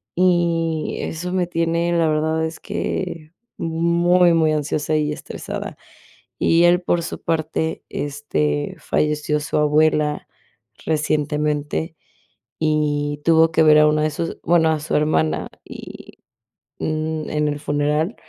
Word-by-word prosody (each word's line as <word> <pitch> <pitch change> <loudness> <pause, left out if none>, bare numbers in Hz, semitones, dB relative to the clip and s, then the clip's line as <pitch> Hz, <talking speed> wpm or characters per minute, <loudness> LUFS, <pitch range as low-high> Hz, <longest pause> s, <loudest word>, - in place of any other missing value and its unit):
y 170 -3 +1
eso 180 +3 -4
me 180 -2 0
tiene, 170 0 0
la 165 -1 +3
verdad 160 +1 0
es 160 - -6
que 165 -4 -4 0.3
muy 170 +2 +3
muy 160 -1 +3
ansiosa 150 +1 -1
y 150 -1 0
estresada. - - -7 0.6
Y 170 +1 +3
él, 175 +1 +4
por 175 -1 0
su 165 - -6
parte, 160 0 -2
este, 75 - -2
falleció 150 0 0
su 145 - -3
abuela 150 0 +2 0.6
recientemente, 150 0 -1 0.7
y 145 -2 0
tuvo 165 0 +5
que 160 - +2
ver 155 -1 +7
a 150 - +6
una 150 0 +2
de 155 - +2
sus 165 +3 -4
bueno, 165 -2 +3
a 155 - 0
su 155 - -2
hermana, 80 - +1 0.2
y - - -11 0.6
n 155 0 -2
en 150 0 +1
el 145 0 -3
funeral 150 +6 0
155 Hz, 130 wpm, -21 LUFS, 150-165 Hz, 0.7 s, ver